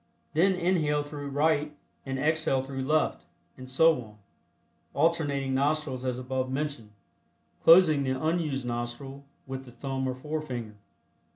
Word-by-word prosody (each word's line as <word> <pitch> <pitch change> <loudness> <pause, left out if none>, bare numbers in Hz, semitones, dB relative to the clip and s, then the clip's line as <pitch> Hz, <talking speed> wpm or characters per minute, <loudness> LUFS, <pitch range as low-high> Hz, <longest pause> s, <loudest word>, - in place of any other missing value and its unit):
Then 185 +5 +4
inhale 165 -5 +1
through 145 -1 -7
right 150 +1 +1 0.3
and 135 0 -2
exhale 150 -2 +1
through 135 0 -5
left, 155 +4 +1 0.3
and 130 0 -10
so 160 +1 +4
on, 105 -2 -14 0.8
alternating 145 -5 +1
nostrils 140 -1 0
as 125 -1 -1
above 130 0 -2
mentioned, 135 -5 -3 0.7
closing 165 -4 +7
the 130 -1 -1
unused 155 -4 -1
nostril 120 +3 -5 0.2
with 130 0 -6
the 125 - -12
thumb 130 +2 -3
or 130 - -2
forefinger. 130 -6 -5
140 Hz, 130 wpm, -28 LUFS, 130-155 Hz, 0.8 s, closing